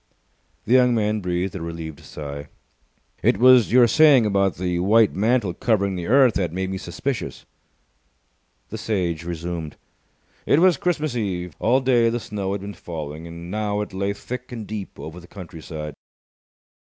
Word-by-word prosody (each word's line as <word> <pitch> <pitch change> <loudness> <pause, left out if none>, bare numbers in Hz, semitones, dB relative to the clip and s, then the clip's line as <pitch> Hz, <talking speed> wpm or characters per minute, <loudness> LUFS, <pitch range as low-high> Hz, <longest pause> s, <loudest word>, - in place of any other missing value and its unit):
The 120 - +1
young 125 -1 +5
man 105 -1 +1
breathed 90 +1 -2
a 95 - -6
relieved 80 -2 -6
sigh. 70 0 -8 0.7
"It - - +3
was 125 -1 +6
your 125 0 +6
saying 150 -2 +6
that 105 - +1
about 100 -2 +1
the 90 -1 -2
white 105 +4 +4
mantle 110 -2 +1
covering 100 -1 +1
the 85 -1 -4
earth 130 0 +5
that 90 -4 -1
made 95 +2 -3
me 95 - -3
suspicious." 100 - -4 1.2
The - - -6
Sage 85 -6 -1
resumed. 85 -2 -5 0.7
It - - +4
was 180 +1 +5
Christmas 155 -6 -1
Eve. 90 - -3
All 125 +4 +3
day 120 -3 +3
the 120 +1 -1
snow 100 -3 -4
had 100 - -4
been 100 +1 -6
falling, 80 -2 -7
and 85 +1 -9
now 105 0 -1
it 105 - -6
lay 100 +1 -1
thick 125 +4 -7
and 115 -3 -6
deep 105 -2 -7
over 80 +3 -8
the 90 - -15
countryside. 80 -5 -8
100 Hz, 165 wpm, -23 LUFS, 85-120 Hz, 1.2 s, was